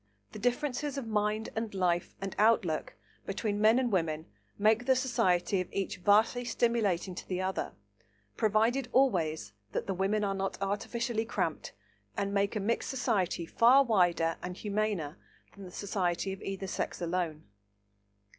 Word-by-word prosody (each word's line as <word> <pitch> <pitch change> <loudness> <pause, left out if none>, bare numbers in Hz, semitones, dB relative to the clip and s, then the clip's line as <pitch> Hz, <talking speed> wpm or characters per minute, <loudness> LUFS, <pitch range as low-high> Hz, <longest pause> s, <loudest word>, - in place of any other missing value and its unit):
The - - -8
differences 270 +4 -1
of 270 - -3
mind 215 0 0
and 220 -2 -3
life 175 -2 0
and 195 0 -5
outlook 210 -7 +2 0.3
between 205 +1 -2
men 220 +2 +6
and 255 -2 +1
women 160 -4 0 0.3
make 220 +4 +3
the 260 - +5
society 205 -8 +1
of 180 - -7
each 195 -1 -2
vastly 210 +6 +3
stimulating 225 -6 0
to - - -8
the 185 -1 -2
other, 190 0 -2 0.6
provided 225 +5 +2
always 160 - +2 0.2
that - - -1
the 195 - -1
women 195 +3 0
are 200 -1 0
not 195 0 -2
artificially 225 +3 -1
cramped, - - -2 0.4
and 200 0 -1
make 200 +2 +1
a - - 0
mixed 220 +4 -1
society 215 -10 0
far 245 +10 +5
wider 175 -8 +2
and 180 0 -5
humaner 205 -7 -2 0.4
than 200 -1 -11
the 180 - -10
society 190 -1 -1
of 190 - -10
either 195 0 -4
sex 190 - -3
alone. 170 -3 -2
200 Hz, 155 wpm, -31 LUFS, 180-230 Hz, 0.6 s, men